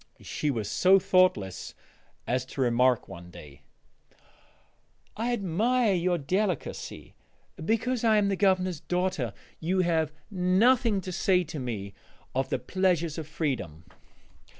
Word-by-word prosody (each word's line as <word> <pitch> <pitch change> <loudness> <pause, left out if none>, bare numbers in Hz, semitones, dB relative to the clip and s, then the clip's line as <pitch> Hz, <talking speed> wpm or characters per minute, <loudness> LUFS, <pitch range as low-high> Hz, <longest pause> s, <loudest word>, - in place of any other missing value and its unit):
She 150 - -2
was 115 -7 -2
so 185 - +5
thoughtless 185 - +1 0.5
as 125 +1 0
to 135 - -5
remark 125 0 +2
one 85 0 -10
day: 75 -5 -13 1.5
"I 230 +3 -1
admire 225 +3 +1
your 175 0 +1
delicacy: 185 +3 -3 0.5
because 230 +5 0
I 220 -2 +4
am 205 -1 +3
the 195 - +1
Governor's 185 -3 +1
daughter 180 - -1 0.3
you 185 +3 +1
have 160 -3 +1 0.2
nothing 205 +4 +3
to 185 - -6
say 180 0 +2
to 155 -2 -7
me 105 -6 -5 0.4
of 135 +1 -1
the - - 0
pleasures 170 +3 0
of 155 - -6
freedom!" 125 - -3
175 Hz, 125 wpm, -28 LUFS, 130-195 Hz, 1.5 s, so